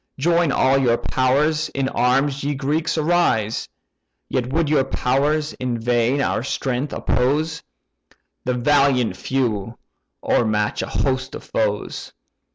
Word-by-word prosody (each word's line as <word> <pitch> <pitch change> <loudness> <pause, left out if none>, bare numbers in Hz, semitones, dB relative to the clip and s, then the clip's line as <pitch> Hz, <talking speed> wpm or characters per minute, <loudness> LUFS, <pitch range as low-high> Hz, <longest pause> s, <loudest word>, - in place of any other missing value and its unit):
Join 170 +2 +2
all 135 0 +3
your 120 -3 +3
powers? 145 +6 +1
in 135 -1 -2
arms, 135 +2 +1
ye 145 +1 -1
Greeks, 150 +5 -1
arise! 155 -10 +1 0.6
Yet 125 -1 -2
would 160 +2 +1
your 145 -2 +3
powers 145 +4 0
in 125 -2 -3
vain 120 +3 +1
our - - 0
strength 130 +2 -2
oppose. 155 +6 0 0.8
The 125 0 -1
valiant 130 -4 +2
few 115 -1 -2 0.5
o'ermatch 105 -2 +1
a - - -4
host 130 -1 -1
of - - -8
foes. 105 -2 -3
135 Hz, 125 wpm, -21 LUFS, 120-145 Hz, 0.8 s, all